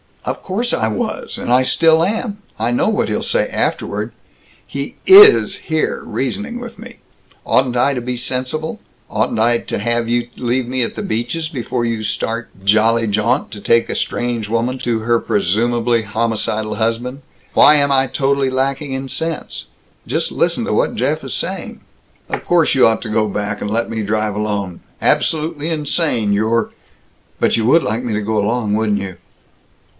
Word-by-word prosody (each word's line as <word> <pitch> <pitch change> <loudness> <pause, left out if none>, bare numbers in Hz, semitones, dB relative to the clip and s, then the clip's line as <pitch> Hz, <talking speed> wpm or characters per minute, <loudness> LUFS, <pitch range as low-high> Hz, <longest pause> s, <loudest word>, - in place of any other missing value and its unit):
"Of - - -3
course 230 +6 -1
I 110 - +1
was! 110 - -3
And 120 - -1
I 130 - +5
still 160 +4 +4
am! 210 +2 -2 0.2
I 115 +2 0
know 120 - +2
what 215 - 0
he'll - - -1
say - - +1
afterward! - - -2 0.5
He - - -6
is 410 +2 +8
here, 160 -1 -1
reasoning 210 - -3
with 235 -1 -9
me. - - -11 0.5
Oughtn't 125 -2 +2
I 135 +3 +3
to 125 - -2
be 125 +1 -3
sensible? 130 +6 -3 0.3
Oughtn't - - -1
I 120 +1 +3
to - - -4
have 115 +2 -1
you 120 0 0
leave 125 0 -1
me 130 +1 -1
at - - -4
the - - -4
Beaches' 120 +9 -2
before 125 -4 -2
you 115 -2 -2
start 115 +2 -3
jolly 110 +3 +3
jaunt 105 +2 0
to 105 - -8
take 115 +3 +2
a - - -2
strange 120 -3 -2
woman 120 +3 -1
to 120 -2 -1
her 115 +1 +1
presumably 115 +5 +1
homicidal 110 0 -2
husband! 120 +4 -2 0.3
Why 150 - +7
am 140 -1 +3
I 135 -1 +3
totally 135 +1 +1
lacking 135 +2 -1
in 135 0 -4
sense? 165 +2 -4 0.4
Just - - -1
listen - - 0
to - - -1
what - - +1
Jeff - - -1
is - - -5
saying!" - - -4 0.5
"Of - - -4
course 170 -3 +3
you 130 - +5
ought 115 - 0
to 115 - -5
go 110 0 +1
back, 105 +1 -3
and 105 - -3
let 115 +2 -1
me 115 -1 -3
drive 105 0 -1
alone. 100 -4 -3 0.2
Absolutely 155 0 0
insane, 150 -8 +1
your 110 +2 +1 0.3
" - - -38
"But - - +3
you 110 - 0
would 160 +8 +5
like 110 +4 -2
me 120 -3 -2
to 105 - -1
go 110 +1 -1
along, 105 0 0
wouldn't 105 -1 +1
you!" 95 -2 -6
120 Hz, 180 wpm, -18 LUFS, 110-140 Hz, 0.5 s, is